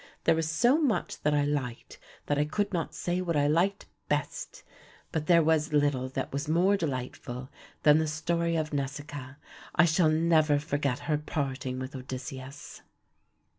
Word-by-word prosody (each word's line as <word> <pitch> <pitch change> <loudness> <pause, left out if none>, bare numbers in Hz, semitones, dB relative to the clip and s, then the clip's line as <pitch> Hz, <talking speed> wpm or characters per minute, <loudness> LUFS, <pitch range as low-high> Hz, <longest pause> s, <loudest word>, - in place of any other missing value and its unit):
There 165 - +5
was 160 -1 -1
so 245 - +3
much 270 -8 0
that 150 0 +2
I 145 - +3
liked 135 -5 -3 0.3
that 145 0 0
I 150 - +3
could 205 +6 -1
not 165 -2 -2
say 175 +1 -1
what 170 -3 -1
I 145 - +3
liked 175 +7 +1 0.2
best, - - -3 0.5
but 155 -2 -2
there 170 -2 +6
was 155 0 +2
little 145 -3 +2
that 135 0 -4
was 140 +2 -2
more 180 +5 +4
delightful 130 -4 -4 0.3
than 150 +1 +6
the 160 - 0
story 170 +2 0
of 155 -2 -1
Nausikaa. 140 -1 -4 0.4
I 175 - +6
shall 165 0 +3
never 155 -2 +3
forget 145 -3 -1
her 150 -2 0
parting 135 -4 -3
with 130 +2 -6
Odysseus. 130 +2 -7
150 Hz, 165 wpm, -29 LUFS, 140-165 Hz, 0.5 s, there